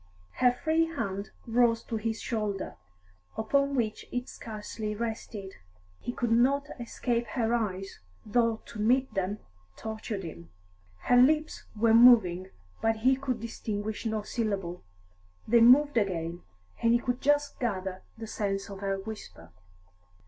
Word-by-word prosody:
Her 250 Hz, -1 st, +5 dB
free 320 Hz, +6 st, +1 dB
hand 200 Hz, -, -4 dB, 0.2 s
rose 230 Hz, -1 st, +3 dB
to 225 Hz, -, -3 dB
his 225 Hz, +1 st, -2 dB
shoulder, 210 Hz, -4 st, -3 dB, 0.6 s
upon 280 Hz, +5 st, +1 dB
which 220 Hz, -4 st, -1 dB
it 245 Hz, 0 st, -3 dB
scarcely 215 Hz, -1 st, -6 dB
rested. 220 Hz, -3 st, -5 dB, 0.5 s
He -, -, -4 dB
could 240 Hz, -1 st, -2 dB
not 275 Hz, +5 st, +3 dB
escape 235 Hz, 0 st, -2 dB
her 230 Hz, -2 st, +1 dB
eyes, 195 Hz, -4 st, -2 dB, 0.3 s
though 230 Hz, 0 st, +1 dB
to 220 Hz, -, -10 dB
meet 255 Hz, +2 st, +2 dB
them 195 Hz, +1 st, -1 dB, 0.4 s
tortured 220 Hz, -2 st, -5 dB
him. 85 Hz, -, -9 dB, 0.5 s
Her 245 Hz, -, +4 dB
lips 305 Hz, +5 st, +3 dB
were 225 Hz, +1 st, +3 dB
moving, 215 Hz, -7 st, +6 dB, 0.3 s
but 225 Hz, 0 st, +2 dB
he 265 Hz, +1 st, +6 dB
could 260 Hz, -3 st, -3 dB
distinguish 215 Hz, -2 st, -4 dB
no 215 Hz, -1 st, -1 dB
syllable; 200 Hz, -6 st, -3 dB, 0.6 s
they 235 Hz, +1 st, +5 dB
moved 280 Hz, +5 st, +7 dB
again, 175 Hz, -5 st, -1 dB, 0.4 s
and 230 Hz, 0 st, +4 dB
he -, -, +6 dB
could 245 Hz, +1 st, -2 dB
just 290 Hz, 0 st, +2 dB
gather 190 Hz, -5 st, -2 dB, 0.2 s
the 225 Hz, -, -6 dB
sense 200 Hz, -2 st, -3 dB
of 195 Hz, -, -8 dB
her 195 Hz, -1 st, -1 dB
whisper. 195 Hz, -, -9 dB
225 Hz, 140 wpm, -29 LUFS, 200-245 Hz, 0.6 s, moved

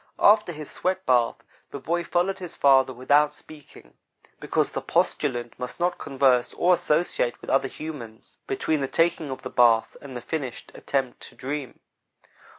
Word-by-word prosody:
After 210 Hz, -3 st, +5 dB
his 155 Hz, -2 st, -8 dB
sweat 185 Hz, +1 st, -2 dB
bath, 120 Hz, -2 st, +3 dB, 0.3 s
the -, -, -6 dB
boy 170 Hz, +5 st, -1 dB
followed 180 Hz, +3 st, 0 dB
his 180 Hz, -3 st, -8 dB
father 135 Hz, -1 st, +4 dB
without 145 Hz, +4 st, +2 dB
speaking, 145 Hz, -, -14 dB, 0.5 s
because -, -, 0 dB
the -, -, -3 dB
postulant 120 Hz, -4 st, -1 dB
must 125 Hz, +4 st, -6 dB
not 175 Hz, +1 st, 0 dB
converse 130 Hz, -3 st, +2 dB
or 180 Hz, +1 st, +4 dB
associate 150 Hz, -7 st, +1 dB
with -, -, -6 dB
other 135 Hz, 0 st, +3 dB
humans 130 Hz, -7 st, -9 dB
between 160 Hz, -, -1 dB
the 135 Hz, -, -1 dB
taking 165 Hz, 0 st, +1 dB
of 130 Hz, -, -6 dB
the 130 Hz, -, -6 dB
bath 115 Hz, -2 st, +3 dB
and 135 Hz, -3 st, -8 dB
the -, -, -7 dB
finished 135 Hz, -1 st, -5 dB
attempt 135 Hz, -3 st, -2 dB
to -, -, -21 dB
dream. 140 Hz, 0 st, -6 dB
140 Hz, 160 wpm, -25 LUFS, 125-170 Hz, 0.5 s, After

